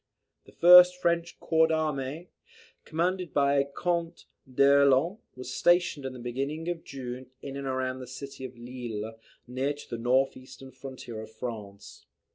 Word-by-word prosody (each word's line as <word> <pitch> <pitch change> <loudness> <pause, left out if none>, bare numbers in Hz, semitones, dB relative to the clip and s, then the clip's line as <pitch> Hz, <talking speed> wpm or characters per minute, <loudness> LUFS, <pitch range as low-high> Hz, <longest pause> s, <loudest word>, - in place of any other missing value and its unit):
The - - -15
first 180 +1 +8
French 170 -1 0
corps 160 -1 +3
d'armee, 155 0 -2 0.6
commanded 175 0 -2
by 140 0 +3
Count 170 -1 -2 0.3
d'Erlon, 140 - +4 0.2
was 130 0 -7
stationed 175 -5 +2
in 130 - -7
the - - -9
beginning 135 +7 -4
of 170 -2 -4
June 130 -1 -7 0.2
in 140 -1 -6
and 140 -1 -5
around 130 0 -2
the 130 - -8
city 130 +1 -9
of 130 -2 -8
Lille, 115 -3 -6 0.3
near 130 +4 -2
to 145 - -13
the 120 - -4
north 130 +3 +2
eastern 130 +1 -12
frontier 130 -4 -8
of 110 - -10
France. 110 -3 -8
135 Hz, 150 wpm, -28 LUFS, 125-160 Hz, 0.6 s, first